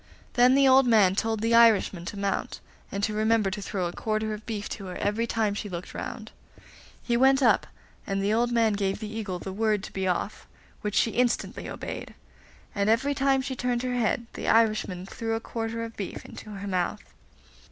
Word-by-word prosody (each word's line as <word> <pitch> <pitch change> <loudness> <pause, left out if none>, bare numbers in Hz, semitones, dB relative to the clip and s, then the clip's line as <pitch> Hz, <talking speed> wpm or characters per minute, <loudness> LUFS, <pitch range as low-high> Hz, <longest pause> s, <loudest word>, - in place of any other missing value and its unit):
Then 250 +1 +5
the 275 0 +5
old 265 0 +6
man 210 -6 +5
told 220 +1 -1
the 230 +1 +1
Irishman 220 -6 +5
to 205 - -6
mount, 200 0 -2 0.3
and 200 0 -3
to 215 - +1
remember 215 -2 +2
to 205 +2 -4
throw 195 -2 -2
a 175 - -3
quarter 215 0 -2
of 215 0 -9
beef 210 -3 -3
to 195 -3 -6
her 180 - -6
every 215 +3 -1
time 220 -3 0
she 205 0 -5
looked 175 -1 -6
round. - - -6 0.7
He 240 - 0
went 265 +2 +4
up, 225 -4 +4 0.4
and 195 0 -1
the 205 +2 +2
old 240 +2 +2
man 230 -2 +3
gave 195 -1 -1
the 215 0 -6
Eagle 200 -5 -3
the 190 +1 -6
word 210 -1 +1
to - - -8
be 190 -1 -1
off, 185 +3 -2 0.3
which 210 -1 -3
she 225 - +3
instantly 245 +1 -1
obeyed; - - -6 0.6
and 200 +1 +1
every 265 +6 +2
time 270 -1 +2
she 260 0 -4
turned 245 -1 -1
her 250 -1 -1
head 235 -1 0
the - - -5
Irishman 215 -5 +2
threw 225 +3 -3
a - - -1
quarter 230 0 -4
of 230 0 -7
beef 195 - -6
into 215 - -10
her 200 -1 -6
mouth. 180 -2 -1
220 Hz, 205 wpm, -27 LUFS, 200-235 Hz, 0.7 s, old